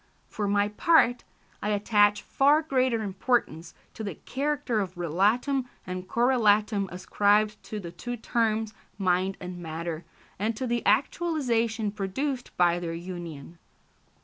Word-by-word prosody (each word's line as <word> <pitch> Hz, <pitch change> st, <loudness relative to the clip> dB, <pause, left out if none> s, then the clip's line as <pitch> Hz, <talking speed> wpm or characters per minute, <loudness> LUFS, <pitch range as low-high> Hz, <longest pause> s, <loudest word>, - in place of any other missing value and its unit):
For 210 Hz, -1 st, -3 dB
my 205 Hz, 0 st, +2 dB
part, 245 Hz, +1 st, +3 dB, 0.4 s
I 210 Hz, -, -1 dB
attach 205 Hz, 0 st, +3 dB
far 290 Hz, +3 st, +3 dB
greater 255 Hz, -6 st, +1 dB
importance 190 Hz, -5 st, -1 dB, 0.2 s
to 220 Hz, -, -7 dB
the 200 Hz, -6 st, -4 dB
character 270 Hz, -, -2 dB
of 185 Hz, -3 st, -3 dB
relatum, 215 Hz, -, +1 dB, 0.2 s
and 185 Hz, 0 st, -5 dB
correlatum 215 Hz, -4 st, +2 dB
ascribed 210 Hz, +3 st, +1 dB
to 215 Hz, -, -5 dB
the 170 Hz, -4 st, -7 dB
two 245 Hz, +6 st, -6 dB
terms 220 Hz, -1 st, 0 dB, 0.2 s
mind 185 Hz, 0 st, +1 dB
and 180 Hz, 0 st, -7 dB
matter, 165 Hz, 0 st, -5 dB, 0.4 s
and 215 Hz, +2 st, -1 dB
to 260 Hz, -, -2 dB
the 240 Hz, -1 st, 0 dB
actualisation 235 Hz, -10 st, +1 dB
produced 245 Hz, +7 st, -3 dB
by 175 Hz, -1 st, +3 dB
their 165 Hz, -1 st, -4 dB
union. 170 Hz, -3 st, -8 dB
210 Hz, 130 wpm, -27 LUFS, 185-240 Hz, 0.4 s, part